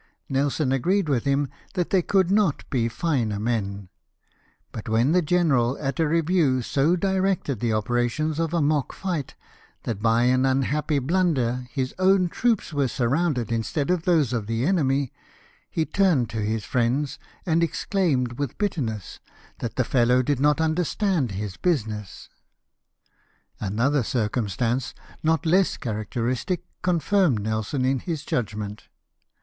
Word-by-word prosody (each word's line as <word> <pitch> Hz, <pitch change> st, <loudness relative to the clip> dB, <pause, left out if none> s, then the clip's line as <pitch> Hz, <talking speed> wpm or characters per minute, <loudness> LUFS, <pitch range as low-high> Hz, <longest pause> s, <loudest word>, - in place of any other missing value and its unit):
Nelson 140 Hz, +1 st, 0 dB
agreed 180 Hz, +8 st, +1 dB
with 130 Hz, -5 st, 0 dB
him 140 Hz, +1 st, +1 dB, 0.3 s
that 180 Hz, -3 st, -1 dB
there 190 Hz, -, +4 dB
could 190 Hz, 0 st, +2 dB
not 200 Hz, -7 st, +1 dB
be 115 Hz, -3 st, +1 dB
finer 120 Hz, -6 st, -1 dB
men; 100 Hz, -4 st, -2 dB, 0.8 s
but 110 Hz, +1 st, -7 dB
when 115 Hz, +6 st, +3 dB
the 180 Hz, +2 st, +4 dB
general 145 Hz, -7 st, +2 dB
at 135 Hz, +2 st, -3 dB
a 160 Hz, -, +3 dB
review 160 Hz, -5 st, +2 dB
so 145 Hz, +8 st, +2 dB
directed 190 Hz, -, 0 dB
the 115 Hz, -1 st, 0 dB
operations 120 Hz, +8 st, 0 dB
of 165 Hz, -1 st, 0 dB
a 170 Hz, -3 st, +1 dB
mock 145 Hz, -2 st, +1 dB
fight 175 Hz, -8 st, -4 dB, 0.5 s
that 110 Hz, -4 st, -4 dB
by 115 Hz, +1 st, +3 dB
an 130 Hz, +1 st, +3 dB
unhappy 140 Hz, +3 st, +1 dB
blunder 135 Hz, -6 st, 0 dB
his 130 Hz, +1 st, -3 dB
OAvn 185 Hz, -2 st, +3 dB
troops 230 Hz, -8 st, 0 dB
were 140 Hz, -2 st, +1 dB
surrounded 130 Hz, 0 st, 0 dB
mstead 120 Hz, +8 st, -1 dB
of 180 Hz, -2 st, 0 dB
those 155 Hz, -9 st, +3 dB
of 110 Hz, -4 st, -2 dB
the 115 Hz, +2 st, -1 dB
enemy, 140 Hz, -7 st, +1 dB, 0.6 s
he 160 Hz, -, -1 dB
turned 165 Hz, -, +2 dB
to 110 Hz, -, -3 dB
his 105 Hz, 0 st, -2 dB
friends 130 Hz, +4 st, 0 dB, 0.3 s
and 165 Hz, -2 st, +2 dB
exclaimed 160 Hz, -, 0 dB
Avith 145 Hz, -4 st, -3 dB
bitterness 120 Hz, -, -3 dB, 0.4 s
that 115 Hz, -, -4 dB
the 130 Hz, -, +2 dB
fellow 125 Hz, +1 st, +3 dB
did 140 Hz, 0 st, 0 dB
not 150 Hz, +2 st, +3 dB
understand 160 Hz, -, 0 dB
his 100 Hz, -1 st, -5 dB
business. 110 Hz, -, -2 dB, 1.3 s
Another 120 Hz, +8 st, +1 dB
circumstance, 120 Hz, +2 st, -1 dB, 0.3 s
not 160 Hz, +1 st, +1 dB
less 185 Hz, +4 st, +3 dB
characteristic, 120 Hz, -, -2 dB, 0.2 s
con 180 Hz, -2 st, +1 dB
firmed 170 Hz, -, +2 dB
Nelson 110 Hz, +5 st, -1 dB
in 130 Hz, 0 st, +1 dB
this 160 Hz, -3 st, -3 dB
judgment. 105 Hz, -2 st, -3 dB
135 Hz, 145 wpm, -24 LUFS, 115-165 Hz, 1.3 s, there